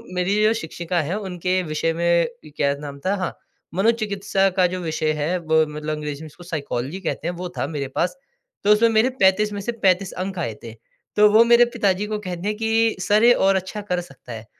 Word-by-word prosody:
मेरी 180 +3 +1
जो 220 +1 +4
शिक्षिका 170 -2 -3
है 170 +7 -2
उनके 185 -2 -1
विषय 160 +1 -1
में 170 +2 +2 0.3
क्या 140 -1 +1
नाम 140 -1 -7
था। 195 +2 +2
हाँ 185 -2 -3 0.4
मनोचिकित्सा 200 -2 +1
का 180 -1 +5
जो 185 - -3
विषय 155 -1 -1
है 175 +5 0
वो 160 -1 +2
मतलब 150 0 -3
अंग्रेज़ी 150 -1 -5
में - - -8
इसको 175 +4 -14
साइकोलॉजी 150 -1 -4
कहते 170 - -3
हैं 175 - -1
वो 180 0 -5
था - - -1
मेरे 145 -3 -4
पास। 180 - 0 0.5
तो 210 - +4
उसमें 230 +2 +4
मेरे 225 +3 +3
35 205 +2 +4
में 200 - -4
से 235 - -2
35 190 0 +3
अंक 190 -2 -5
आए 115 -10 -3
थे। 115 -1 -8 0.4
तो 210 0 +6
वो 225 +2 +8
मेरे 240 0 +7
पिताजी 200 -1 +1
को 215 0 -3
कहते 180 -2 -5
हैं 210 - 0
कि 225 0 +2
सर 210 +4 +3
ये 245 +1 +8
और 195 -2 +3
अच्छा 190 +3 -3
कर 180 0 +1
सकता 135 -7 -13
है। 110 0 -8
185 Hz, 220 wpm, -22 LUFS, 160-210 Hz, 0.5 s, वो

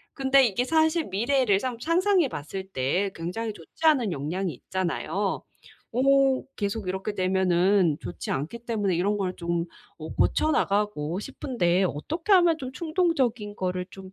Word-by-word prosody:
근데 270 0 +4
이게 230 +4 0
사실 320 +2 +2
미래를 215 0 +2
상 250 -3 -3
상상해 350 +1 +2
봤을 190 +4 -6
때 180 +7 0
굉장히 210 +7 -4
좋지 185 - -13
않은 255 - +4
영향이 165 +5 -2
있잖아요. 190 +6 -2 0.5
어 270 +1 +3
계속 205 0 -3
이렇게 190 +3 -3
되면은 185 -3 +2
좋지 - - -6
않기 155 +13 -3
때문에 210 -6 -1
이런 200 +4 +1
걸 185 -3 -2
좀 170 -1 -2 0.3
어 155 - -7
고쳐 310 - +2
나가고 195 - 0
싶은데 195 -9 0
'어떻게 320 - -2
하면 345 -4 +5
좀 260 -2 -6
충동적인 265 - 0
거를 180 -1 -2
좀 190 -1 -11
205 Hz, 305 characters per minute, -26 LUFS, 185-270 Hz, 0.5 s, 하면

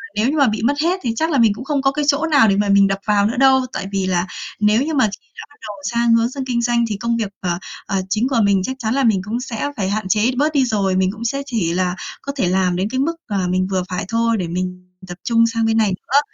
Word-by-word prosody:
nếu 215 +4 +1
như 305 - -1
mà 280 - +4
bị 215 -1 -1
mất 260 +5 +3
hết 365 +3 +1
thì 235 - -1
chắc 320 +6 0
là 280 - +2
mình 225 -4 +4
cũng 220 - -8
không 285 -2 0
có 270 - +2
cái 295 +1 -2
chỗ 290 +2 +2
nào 280 -6 +6
để 195 - +3
mà 205 0 0
mình 200 0 +5
đập 195 0 -2
vào 205 -1 +3
nữa 235 +4 -1
đâu. 265 0 +5
Tại 195 - -4
vì 195 -1 -1
là 180 0 0 0.3
nếu 210 +3 +3
như 315 +2 -2
mà 260 -6 +3 0.2
khi - - -35
đã - - -7
bắt 290 - -21
đầu 210 - -7 0.2
sang 235 0 +2
hướng 230 +2 +2
sang 270 -1 -5
kinh 240 -2 -1
doanh 235 0 +1
thì 210 - -2
công 235 +2 -1
việc, 220 -3 -2
ờ, 175 -1 -2 0.3
ờ, 195 -1 -1
chính 220 +5 +1
của 255 -4 +1
mình 200 -2 +3
chắc 260 +6 -3
chắn 225 -1 -1
là 275 0 +1
mình 210 -5 +2
cũng 220 +4 -3
sẽ 255 +3 -4
phải 190 -2 -1
hạn 210 0 -2
chế 215 +6 +2
bớt 305 +2 +1
đi 270 -3 +3
rồi, 200 -5 0
mình 185 0 +2
cũng 225 +2 -8
sẽ 275 +4 -1
chỉ 215 -11 -1
là 180 0 0 0.3
có 280 - -4
thể 250 -10 0
làm 185 0 +1
đến 190 +3 -1
cái 260 +3 -2
mức, 330 +5 0
à, 205 - -2
mình 185 +1 0
vừa 185 -1 0
phải 180 0 -3
thôi 230 +1 +1
để 180 - -2
mình 180 +1 -4 0.2
tập 175 -1 -8
trung 230 -1 +3
sang 230 -1 -1
bên 225 0 +1
này 215 -2 +3
nữa. 245 +9 +1
225 Hz, 300 wpm, -19 LUFS, 195-260 Hz, 0.3 s, nào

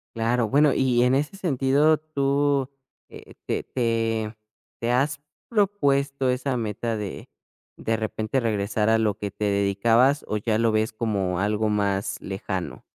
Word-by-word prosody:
Claro. 115 +1 +1
Bueno, 145 +5 +4
y 130 -2 +2
y - - +5
en 125 +1 +3
ese 150 +7 -1
sentido, 145 -2 +2
¿tú, 140 -2 0 0.4
eh, - - -13
te - - -1
te 115 -2 -1 0.4
te 120 +1 -1
has 140 +4 +1 0.3
propuesto 140 - +1
esa 125 +1 -1
meta 115 0 -2
de 105 -2 -6 0.5
de 115 0 -1
repente 110 +3 -2
regresar 110 -2 0
a 115 0 +4
lo 105 -2 0
que 100 -1 -4
te 105 - -4
dedicabas, 110 +7 +3
o 105 - -1
ya 110 +1 0
lo 115 -1 +3
ves 110 +1 0
como 100 -6 -1
algo 105 +2 0
más 100 -1 -1
lejano? 95 -1 -5
115 Hz, 155 wpm, -24 LUFS, 105-135 Hz, 0.5 s, y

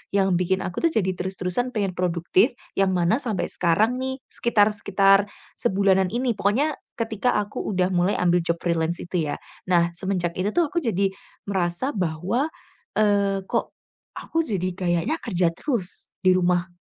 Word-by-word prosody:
yang 195 -2 +3
bikin 190 +1 +1
aku 180 - -4
tuh 335 - +4
jadi 190 -4 +1
terus-terusan 190 +6 -2
pengen 200 -3 0
produktif, 180 - +2 0.3
yang 195 -1 +3
mana 175 +5 +2
sampai 220 -7 -1
sekarang 210 +8 +2
nih 265 +1 -3
sekitar 215 -4 +2
sekitar 195 -1 +4 0.4
sebulanan 190 -1 +2
ini 245 0 0
pokoknya 240 +10 +1 0.2
ketika 230 +1 0
aku 205 0 -4
udah 180 -1 +2
mulai 180 +3 +2
ambil 175 0 +3
job 170 0 -1
freelance 170 0 0
itu 170 -5 -2
ya. - - -2 0.3
Nah, 170 -1 +4
semenjak 175 -2 -2
itu 200 +3 0
tuh 345 -2 +3
aku 340 +2 -2
jadi 200 -4 +1 0.4
merasa 190 +6 -1
bahwa, 185 - 0 0.5
eee, 200 -2 +2
"Kok, - - 0 0.5
aku 330 0 -1
jadi 185 - -1
kayaknya 175 - 0
kerja 180 -6 +1
terus 225 - -3
di 185 -1 +4
rumah". 180 0 +2
190 Hz, 155 wpm, -24 LUFS, 175-220 Hz, 0.5 s, tuh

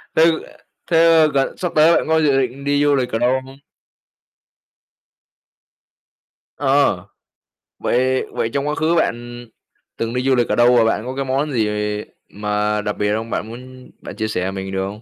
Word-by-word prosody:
thế 165 +1 +5 0.6
thế, 165 - +4
ơ, 165 -1 +5
gần 135 -1 0
sắp 180 -2 -3
tới 160 +2 +6
bạn - - -1
có 160 0 +3
dự 145 -3 +3
định 130 +2 -4
đi 145 +1 +1
du 145 -1 +3
lịch 125 -2 -1
ở 115 - -1
đâu 125 +2 +1
không? 135 +1 -14 3.0
Ờ, 135 -10 +1 0.7
vậy 130 +1 +1
vậy 115 - -2
trong 140 0 -1
quá 150 - -1
khứ 165 +2 +1
bạn 120 -5 -2 0.5
từng 115 0 -3
đi 125 - -1
du 135 0 +3
lịch 120 -2 +1
ở - - +1
đâu 120 +1 +5
và 120 - +5
bạn 110 0 0
có 130 +1 -5
cái 135 0 -2
món 135 +3 -1
gì 110 -5 0 0.6
mà 105 +1 -1
đặc 105 0 -4
biệt 105 0 0
không, 115 +1 -4
bạn 110 - -3
muốn 125 +2 -12
bạn - - -9
chia 110 - -2
sẻ 95 -3 -2
mình 95 0 -6
được 95 0 -2
không? 105 +2 -9
125 Hz, 190 wpm, -19 LUFS, 110-140 Hz, 3.0 s, tới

